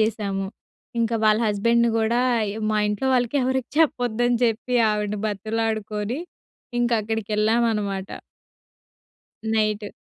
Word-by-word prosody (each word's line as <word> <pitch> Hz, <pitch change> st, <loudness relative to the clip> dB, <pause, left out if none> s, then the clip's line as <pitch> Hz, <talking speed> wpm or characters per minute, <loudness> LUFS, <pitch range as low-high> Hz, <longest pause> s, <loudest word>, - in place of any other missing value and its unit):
జేశాము. 200 Hz, -3 st, -1 dB, 0.5 s
ఇంకా 230 Hz, 0 st, +1 dB
వాళ్ళ 215 Hz, 0 st, +5 dB
హస్బెండ్‌ని 235 Hz, +3 st, +2 dB
గూడా 230 Hz, +2 st, +2 dB, 0.3 s
య్ -, -, -7 dB
మా 215 Hz, -, +1 dB
ఇంట్లో 210 Hz, +5 st, -1 dB
వాళ్ళకి 245 Hz, +2 st, +1 dB
ఎవరికీ 260 Hz, -1 st, -1 dB
చెప్పొద్దని 245 Hz, -5 st, +2 dB
చెప్పి 235 Hz, +2 st, -1 dB
ఆవిడని 210 Hz, -1 st, -1 dB
బతిమలాడుకొని, 215 Hz, +2 st, -2 dB, 0.6 s
ఇంకక్కడికేళ్ళామనమాట. 215 Hz, -2 st, 0 dB, 1.4 s
నైటు. 215 Hz, -1 st, 0 dB
220 Hz, 95 wpm, -23 LUFS, 210-235 Hz, 1.4 s, వాళ్ళ